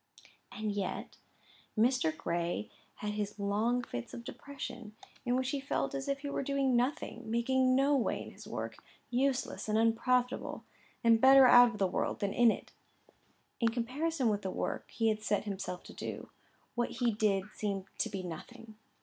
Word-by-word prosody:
And 215 0 -3
yet 200 -2 -4 0.6
Mr. 220 -9 +2
Gray 170 +4 -2 0.2
had 210 - -3
his 210 0 -3
long 215 +5 +1
fits 120 - -6
of 235 - -7
depression, 245 -4 -8 0.3
in 245 0 +2
which 260 +1 0
he 285 - -1
felt 275 - -1
as 275 0 -3
if 275 0 -1
he 285 - -4
were - - -1
doing 275 -2 +1
nothing, 245 -2 -1
making 255 +3 +3
no 275 +2 +4
way 255 - +1
in - - -10
his - - -12
work, - - -5 0.3
useless 255 -2 0
and 215 - +2
unprofitable, 245 +3 +1 0.4
and 230 -1 +5
better 270 0 +9
out 245 -1 +9
of 230 - -7
the 195 - +2
world 185 - -1
than 200 -1 0
in 240 -1 +6
it. - - -3 0.9
In 230 - +3
comparison 260 +5 -1
with 205 -1 0
the 190 - -3
work - - -3
he 225 -2 +1
had 215 0 -1
set 205 -2 0
himself 190 -3 -5
to - - -11
do, - - -6 0.4
what 240 -1 0
he 240 -2 0
did 205 -3 +1
seemed 200 -3 -2
to 225 - +1
be 195 -3 -4
nothing. 220 +6 -9
235 Hz, 175 wpm, -32 LUFS, 210-255 Hz, 0.9 s, better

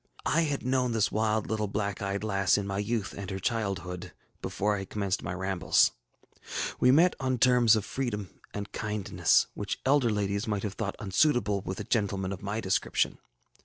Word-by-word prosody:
I 165 - +3
had 145 -5 -1
known 130 -2 +1
this 110 -3 +2
wild 110 0 +1
little 105 -1 -1
black 100 -1 -2
eyed 100 +1 -2
lass 100 -4 +2
in 100 - -2
my 100 0 -2
youth 105 0 -2
and 100 -2 -6
her 95 - -3
childhood, 95 -4 -3 0.3
before 105 +1 0
I - - -3
had 95 - -7
commenced 100 -3 -1
my - - -4
rambles. 95 0 +2 0.9
ŌĆ£We 125 - +5
met 170 +6 +5
on 130 -1 0
terms 120 -1 +5
of 105 -2 -1
freedom 105 - -3 0.2
and 100 0 -6
kindness, 105 -2 +1
which 100 0 -4
elder 135 -3 +4
ladies 100 0 -1
might 105 -2 -1
have 105 -2 -3
thought 100 -2 -3
unsuitable 105 -1 +2
with 95 +1 -5
a - - -3
gentleman 100 -4 -1
of 95 - -8
my 105 +2 -3
description. 95 -4 0
105 Hz, 185 wpm, -29 LUFS, 100-115 Hz, 0.9 s, ŌĆ£We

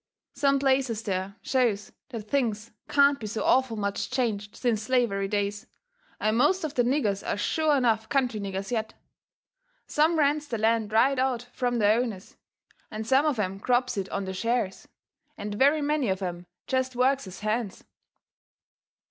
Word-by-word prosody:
Some 275 0 +2
places 265 -5 +1
there 190 -1 -3
shows 235 -6 0 0.2
that 230 -5 -5
things 225 -2 -1 0.2
can't 280 0 +4
be 215 - -5
so 215 +1 -3
awful 260 -4 +2
much 200 -1 -2
changed 220 -5 -2
since 235 -4 0
slavery 215 -4 +1
days, 205 0 -2 0.5
and 215 +1 +1
most 310 +10 +3
of 305 -2 -3
the 250 - +2
niggers 240 -6 +1
are - - -2
sure 305 +7 +1
enough 225 -3 +1
country 250 -5 +1
niggers 195 +1 -4
yet. 220 -1 -2 0.9
Some 315 +3 +2
rents 295 0 +2
their 235 - -3
land 220 0 +1
right 255 +5 +3
out 255 -2 0
from 245 -2 -1
the 210 -2 +4
owners, 225 -4 -2 0.5
and 215 0 -5
some 270 +6 +3
of 290 -5 0
'em 195 -2 -2
crops 245 +2 +1
it 195 -2 -3
on 200 -1 -3
the 190 - -4
shares, 230 0 -2 0.5
and 205 0 -5
very 285 +7 +3
many 290 -5 +1
of 190 +1 -1
'em 175 -1 -5 0.2
jest 260 -1 -1
works 260 -1 +2
as 185 - -10
hands. 215 -1 -2
230 Hz, 165 wpm, -27 LUFS, 205-265 Hz, 0.9 s, can't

